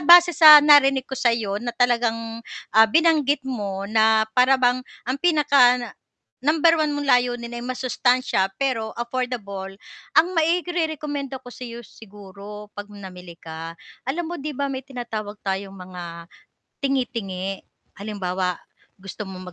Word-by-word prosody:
base 350 +3 +7
sa 305 -2 +10
narinig 275 -3 +5
ko - - -14
sa 245 - +2
'yo 210 -4 -2
na 240 0 -4
talagang, 230 -2 0 0.3
ah, 220 0 +7
binanggit 300 -1 +2
mo 200 -6 -4
na 220 0 +3
para 255 +3 +4
bang 250 0 +2 0.2
ang 255 +3 -2
pinaka-number 285 - +1
1 305 - +1
mong 290 - -3
layunin 245 -2 +1
ay 240 - -5
masustansiya 250 -4 0
pero 255 -5 -1
affordable. 235 -6 -5 0.4
Ang 340 +3 +4
mairere-komenda 315 -5 -1
ko 250 -1 -12
sa 250 0 -9
'yo 235 +1 -9
siguro 205 0 -12
'pag 205 0 -9
namili 180 -4 -11
ka, 165 0 -9 0.3
alam 330 +6 -2
mo 345 -1 -6
'di 295 -1 -6
ba, 280 -1 -2
may 260 - -4
tinatawag 235 -6 -7
tayong 195 0 -3
mga 175 -2 -9 0.6
tingi-tingi. 225 -9 -3 0.3
Halimbawa, 185 -3 -3 0.4
gusto 195 +1 -8
mong 185 -1 -9
240 Hz, 135 wpm, -22 LUFS, 200-275 Hz, 0.6 s, sa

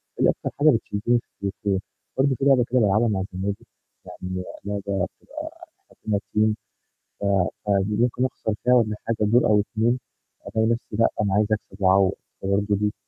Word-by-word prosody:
دي - - +3
أكتر - - -1
حاجة 155 - +6
بتشدني 115 -1 +1
في - - -15 0.3
التليفون. 100 0 -1 0.4
برضو 135 0 +3
فيه 135 - -2
لعبة 135 -3 +5
كده 125 - +3
بالعبها 110 +1 +3
مع 100 -4 0
زمايلي، 100 +2 -2 0.5
يعني 90 0 -5 0.2
لعبة 100 -2 -1 0.2
بتبقى 315 +3 -8 0.3
إحنا - - -24
كنا 105 -2 +2
team، 105 +1 +1 0.7
ف - - -5 0.4
فدي 100 +1 +2
ممكن 125 +1 +2
أخسر 110 -4 -2
فيها 125 - +4
والّا 110 -4 +3
حاجة 115 - +1
دور 110 +4 +4
أو 105 -1 +4
2، 115 +4 0 0.5
ألاقي 110 0 +1
نفسي 115 -2 -3
لأ، 115 - +6
أنا 100 -2 +1
عايز 105 0 +3
أكسب 105 -2 -3
وأعوض 95 0 +5 0.3
فبرضه 100 +1 +1
دي 105 +1 0
105 Hz, 175 wpm, -24 LUFS, 100-120 Hz, 0.7 s, حاجة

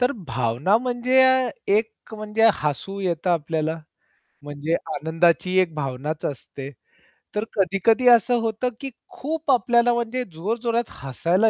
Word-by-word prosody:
तर 250 +2 +2 0.2
भावना 125 - +1
म्हणजे 250 +1 +2
अ, 260 -1 +4 0.2
एक, 220 +2 +2 0.2
म्हणजे 215 +1 +2
हसू 150 +7 -3
येतं 180 -1 -1
आपल्याला 160 -1 -1 0.6
म्हणजे 145 +2 -3 0.2
आनंदाची 170 +3 +1
एक 170 -4 -1
भावनाच 150 +1 -4
असते. 135 0 -6 0.7
तर 210 - 0
कधी-कधी 205 +6 +2
असं 240 +1 +5
होतं, 225 +2 -1
की 275 - -5 0.2
खूप 310 +1 -3
आपल्याला 240 -1 +3
म्हणजे 235 +2 -2
जोरजोरात 230 +7 -2
हसायला 170 - +1
200 Hz, 125 wpm, -23 LUFS, 160-240 Hz, 0.7 s, असं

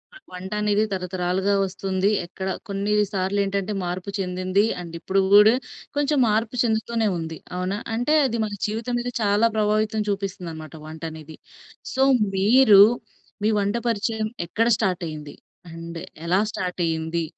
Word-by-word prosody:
ఆ - - -10 0.2
వంటనేది 210 +3 0
తరతరాలుగా 185 +1 -1
వస్తుంది. 190 +1 -1 0.2
ఎక్కడ 190 +2 -6 0.2
కొన్నీ 200 +1 -1 0.2
సార్లేంటంటే, 200 +1 -1
మార్పు 180 +2 -4
చెందింది, 185 +1 0 0.2
అండ్ 170 -1 -9
ఇప్పుడు 195 +3 0
గూడా 210 +2 +8 0.4
కొంచెం 290 0 +1
మార్పు 220 +2 0
చెందుతూనే 225 -1 0
ఉంది. 160 -1 -5 0.2
అవునా? 185 +2 -2 0.2
అంటే, 245 +6 +1
అది 235 -3 -1
మన 210 - -5
జీవితం 225 +3 -2
మీద 245 - -3
చాలా 210 +2 +3
ప్రభావితం 215 0 +1
చూపిస్తుందనమాట 175 -6 -5
వంటనేది. 160 0 -8 0.6
సో, 265 - 0 0.3
మీరు 210 +1 +6 0.6
మీ 215 - +3
వంట 200 +2 0
పరిచయం 220 0 -1 0.2
ఎక్కడ 225 +7 0
స్టార్టయింది? 170 -8 -3 0.4
అండ్ 165 0 -8 0.3
ఎలా 180 +3 +3
స్టార్టయ్యింది? 170 -3 -2
195 Hz, 125 wpm, -23 LUFS, 180-215 Hz, 0.6 s, గూడా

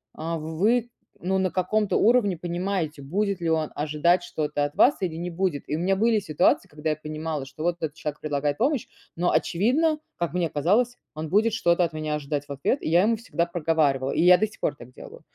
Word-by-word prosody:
а, 165 +1 -3
вы 205 +10 +1 0.3
ну 190 +2 0
на 190 -1 0
каком-то 205 +3 0
уровне 225 -4 +3
понимаете, 175 -3 -3
будет 195 +7 -1
ли 170 -1 -1
он 160 -1 0
ожидать 155 +4 +2
что-то 150 -3 -2
от 145 - -6
вас, 275 - +5
или 175 -4 -2
не 175 +2 -4
будет. 175 -4 -1
И - - 0
у - - -4
меня 190 +3 +1
были 220 +2 +3
ситуации, 155 -7 +1
когда 150 +1 -4
я 155 - +1
понимала, 155 -1 -4
что 140 +3 -9
вот 175 0 0
этот 155 -3 -3
человек 150 -2 -5
предлагает 145 -1 -1
помощь, 275 +1 0 0.3
но 175 +1 +1
очевидно, 290 - +2 0.2
как 170 -1 -2
мне 175 -2 0
казалось, 215 - +1 0.2
он 155 0 -5
будет 215 +5 +3
что-то 175 -4 +2
от 165 - -6
меня 155 -1 -2
ожидать 145 -1 -3
в - - -9
ответ. 140 - -1
И - - -3
я 170 +3 +5
ему 230 +2 +3
всегда 215 -7 -2
проговаривала, 155 -6 +1
и - - 0
я 180 0 +8
до 215 - +1
сих 215 - -17
пор - - -1
так 125 -3 -13
делаю. - - -12
170 Hz, 220 wpm, -25 LUFS, 150-195 Hz, 0.3 s, я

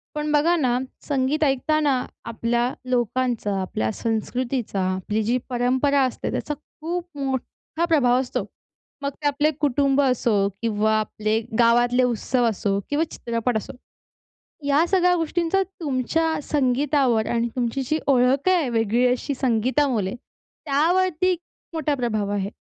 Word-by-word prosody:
पण 300 0 -2
बघा 315 +4 +3
ना, 250 -6 +1 0.3
संगीत 285 +2 +1
ऐकताना 280 -1 +1 0.2
आपल्या 235 +2 -1 0.2
लोकांचा, 240 -4 0
आपल्या 110 -12 -2
संस्कृतीचा, 230 -1 -2
आपली 210 +3 -2
जी 240 +4 +1
परंपरा 260 +3 +2
असते 255 - -2
त्याचा 295 - -2 0.3
खूप 345 +2 -3
मोठा 275 +4 -3
प्रभाव 260 -7 +3
असतो. 260 -1 -2 0.6
मग 280 - -1
ते 290 - +1
आपले 290 +2 +2
कुटुंब 280 0 +2
असो 245 -5 +2 0.2
किंवा 215 -1 +1
आपले 215 +1 -1 0.2
गावातले 240 +2 +4
उत्सव 245 +1 +1
असो 200 -1 -1
किंवा 290 +2 +1
चित्रपट 235 0 -2
असो, 215 - -6 0.9
या 285 +3 +3
सगळ्या 360 -1 +3
गोष्टींचा 340 +3 0
तुमच्या 325 -3 -1 0.2
संगीतावर 265 -4 +2
आणि 235 0 +1
तुमची 245 +2 -1
जी 310 +5 0
ओळख 270 +5 +3
आहे 340 -8 +2
वेगळी 230 +1 +1
अशी 255 +3 -1
संगीतामुळे, 245 -3 +1 0.5
त्यावरती 360 +5 +2 0.4
मोठा 305 -2 0
प्रभाव 215 -5 -1
आहे? 200 0 -2
255 Hz, 125 wpm, -23 LUFS, 235-295 Hz, 0.9 s, गावातले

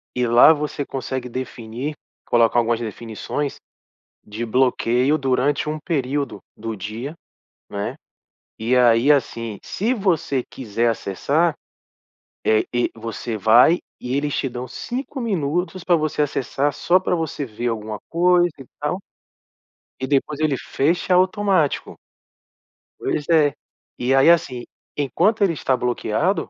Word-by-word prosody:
e 125 -1 +1
lá 120 +7 +8
você 145 -1 -3
consegue 130 -1 -4
definir, 125 +3 -5 0.3
colocar 120 0 +4
algumas 115 0 +1
definições 115 +5 -4 0.7
de 110 +3 -5
bloqueio 125 +3 +2
durante 135 +2 +1
um 155 0 -2
período 140 - -2 0.2
do 115 0 -5
dia, 110 - -6 0.6
não 100 - -5
é? 100 - -3 0.6
E 120 +3 +1
aí 120 +3 +5
assim, 115 -6 +1
se 230 +6 -1
você 165 - 0
quiser 115 -1 -2
acessar, 145 - 0 0.9
eh 110 0 +4
e 120 - +1
você 115 0 -5
vai 120 - +6 0.2
e 125 +2 -3
eles 145 0 -1
te 135 - 0
dão 125 0 -5
cinco 265 - -5
minutos 180 - -1
pra 175 - +4
você 155 -1 -1
acessar 145 0 0
só 175 +5 +3
pra 180 - 0
você 160 -3 -3
ver 120 +1 -4
alguma 110 -2 -3
coisa 175 +1 +4
e 135 - -10
tal. 180 +6 -2 1.0
E 130 - -1
depois 145 +1 0
ele 145 -4 +2
fecha 170 +6 0
automático. 185 -4 +2 1.0
Pois 145 - -2
é. 155 -3 +4 0.4
E 125 +2 +1
aí 135 +4 +6
assim, 130 -8 +2 0.3
enquanto 180 - +2
ele 175 -4 +3
está 135 -3 0
bloqueado, 125 - 0
135 Hz, 135 wpm, -22 LUFS, 120-160 Hz, 1.0 s, lá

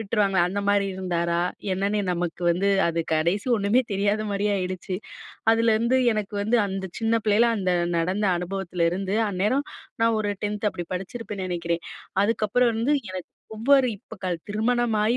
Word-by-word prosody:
விட்டுருவாங்களே? 200 -4 +2
அந்த 200 +2 -2
மாரி 200 -1 +2
இருந்தாரா? 170 -2 0 0.3
என்னன்னே 200 +2 0
நமக்கு 175 0 -3
வந்து 195 +3 +1 0.2
அது 165 0 0
கடைசி, 170 +6 +1
ஒண்ணுமே 205 +5 +3
தெரியாத 205 +2 +1
மாரி 200 0 -1
ஆயிடுச்சு. 185 0 -3 0.6
அதுலருந்து 230 +2 +3 0.2
எனக்கு 210 -1 -3
வந்து, 220 +4 +2
அந்த 190 -1 -4
சின்ன 225 0 +1
பிள்ளைல, 215 +3 +4
அந்த 185 -2 0 0.3
நடந்த 185 +5 0
அனுபவத்துலருந்து, 180 +1 -1
அந்நேரம் 210 +9 0 0.4
நான் 230 0 +3
ஒரு 210 -1 -1
10த் 210 0 -2
அப்பிடி 175 -3 -5
படிச்சிருப்பேன்னு 195 +1 -5
நினைக்கிறேன். 170 -1 -2 0.4
அதுக்கப்புறம் 230 +3 +2
வந்து, 230 +6 +1 0.2
எனக்கு 185 -2 -6 0.3
ஒவ்வொரு 270 +3 +4
இப்ப 225 +2 -13
கல் 175 -2 -1
திருமணமாயி 225 +1 +1
200 Hz, 140 wpm, -25 LUFS, 185-220 Hz, 0.6 s, பிள்ளைல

